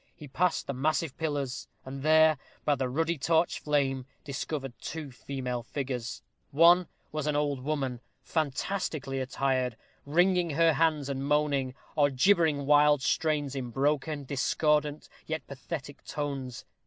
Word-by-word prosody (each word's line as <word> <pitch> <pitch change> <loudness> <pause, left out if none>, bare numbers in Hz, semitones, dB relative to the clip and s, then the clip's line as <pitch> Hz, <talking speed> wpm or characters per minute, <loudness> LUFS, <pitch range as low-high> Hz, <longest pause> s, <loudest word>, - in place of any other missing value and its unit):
He 150 - -10
passed 175 +6 0
the 140 - -3
massive 150 +2 0
pillars, 145 -5 -3 0.2
and 135 +1 -6
there, 155 0 +5 0.3
by 150 - +4
the 130 -2 -1
ruddy 165 +4 0
torch 165 +4 +2
flame, 135 -3 0 0.2
discovered 135 -1 -4
two 155 -3 -6
female 125 -1 -4
figures. 125 -1 -4 0.3
One 170 +4 +6 0.2
was 155 -1 -3
an 150 - +1
old 145 -2 0
woman, 135 -4 -2 0.2
fantastically 150 -2 -2
attired, 130 -2 0 0.3
wringing 175 +3 +3
her 165 +2 +4
hands, 155 -2 +2
and 135 -1 -3
moaning, 145 -3 +1 0.2
or 145 -2 +4
gibbering 150 0 +3
wild 145 -1 +5
strains 145 0 +1
in 130 -3 -3
broken, 145 +3 0
discordant, 150 +2 +1 0.2
yet 160 0 -3
pathetic 140 +1 -7
tones. 135 -4 -4
145 Hz, 135 wpm, -29 LUFS, 135-155 Hz, 0.3 s, One